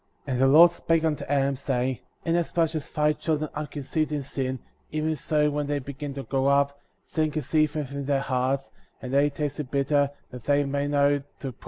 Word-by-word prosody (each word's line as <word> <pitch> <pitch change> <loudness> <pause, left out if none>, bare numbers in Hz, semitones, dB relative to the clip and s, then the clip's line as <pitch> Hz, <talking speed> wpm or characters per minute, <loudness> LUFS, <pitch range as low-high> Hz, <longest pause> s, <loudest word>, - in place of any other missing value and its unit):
55. 135 - -2
And 125 - 0
the 135 +3 +6
Lord 170 +1 +9
spake 165 -1 0
unto 155 -2 0
Adam, 140 0 +1
saying: 130 -2 -1 0.3
Inasmuch 165 -1 +1
as 155 -3 -4
thy 150 -1 +2
children 155 -1 -2
are 150 0 -4
conceived 155 +2 -2
in 145 -2 -1
sin,^ 130 -1 -3 0.3
even 155 +1 0
so 150 0 +1
when 145 0 -2
they 145 0 0
begin 140 +1 -6
to 135 - -4
grow 135 0 0
up, 140 0 +2 0.2
sin 155 -1 0
conceiveth 150 -1 0
in 140 0 -4
their 140 0 +2
hearts, 130 +1 -1 0.3
and 130 0 -6
they 140 +1 +4
taste 145 0 -3
the 150 - -2
bitter, 140 +1 +1 0.2
that 125 -2 -9
they 145 0 +3
may 140 +1 -1
know 145 0 +3
to - - -6
prize 140 - -28
the 140 - -4
good. - - -19
145 Hz, 215 wpm, -26 LUFS, 135-150 Hz, 0.3 s, Lord